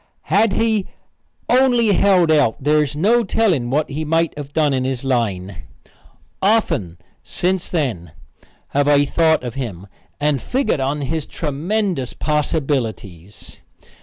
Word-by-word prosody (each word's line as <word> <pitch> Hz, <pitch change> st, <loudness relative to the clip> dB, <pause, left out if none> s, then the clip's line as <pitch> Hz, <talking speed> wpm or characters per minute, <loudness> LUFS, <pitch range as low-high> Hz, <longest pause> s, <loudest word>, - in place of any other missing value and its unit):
Had 205 Hz, +1 st, +4 dB
he 220 Hz, -3 st, 0 dB, 0.6 s
only 245 Hz, -3 st, +3 dB
held 185 Hz, -4 st, +3 dB
out 145 Hz, -7 st, +3 dB
there 150 Hz, +2 st, +3 dB
is 145 Hz, -1 st, -3 dB
no 225 Hz, +10 st, +3 dB
telling 185 Hz, -, +1 dB
what 150 Hz, +4 st, 0 dB
he 155 Hz, +3 st, -3 dB
might 165 Hz, +1 st, 0 dB
have 145 Hz, -1 st, -8 dB
done 150 Hz, -2 st, +1 dB
in 130 Hz, -1 st, 0 dB
his 130 Hz, -1 st, -3 dB
line. 100 Hz, -8 st, -2 dB, 0.8 s
Often, 165 Hz, -, +1 dB, 0.2 s
since 185 Hz, 0 st, -2 dB
then, 115 Hz, -, -2 dB, 0.6 s
have 145 Hz, 0 st, +1 dB
I 145 Hz, -1 st, +4 dB
thought 160 Hz, 0 st, +2 dB
of 120 Hz, -2 st, -5 dB
him 110 Hz, -9 st, -6 dB, 0.3 s
and 145 Hz, -2 st, 0 dB
figgered 255 Hz, -, -1 dB
on 140 Hz, +2 st, -1 dB
his 150 Hz, +2 st, -3 dB
tremendous 165 Hz, -, -2 dB
possibilities. 130 Hz, -, -3 dB
150 Hz, 135 wpm, -19 LUFS, 130-185 Hz, 0.8 s, Had